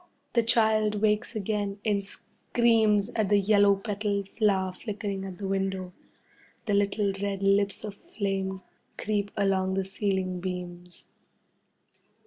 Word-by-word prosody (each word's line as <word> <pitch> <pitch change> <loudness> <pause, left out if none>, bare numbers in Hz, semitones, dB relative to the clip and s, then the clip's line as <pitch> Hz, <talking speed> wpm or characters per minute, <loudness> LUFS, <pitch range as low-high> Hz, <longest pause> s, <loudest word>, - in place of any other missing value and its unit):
The 235 - +4
child 220 -2 +3
wakes 215 +2 +1
again 205 -1 -2
and 205 -2 +1
screams 220 0 +1
at 220 -5 -1
the 205 -1 +5
yellow 200 0 +5
petalled 200 -1 -2
flower 195 -4 +1
flickering 200 -1 -4
at 185 -2 -7
the 195 - -4
window. 190 -1 -2 0.7
The 210 - 0
little 200 0 +1
red 200 -1 -2
lips 200 +1 +2
of 210 -2 -5
flame 195 -2 -3 0.3
creep 205 -1 -1
along 190 -2 +1
the 195 - +1
ceiling 190 -2 -2
beams. 180 -1 -7
200 Hz, 125 wpm, -28 LUFS, 190-210 Hz, 0.7 s, the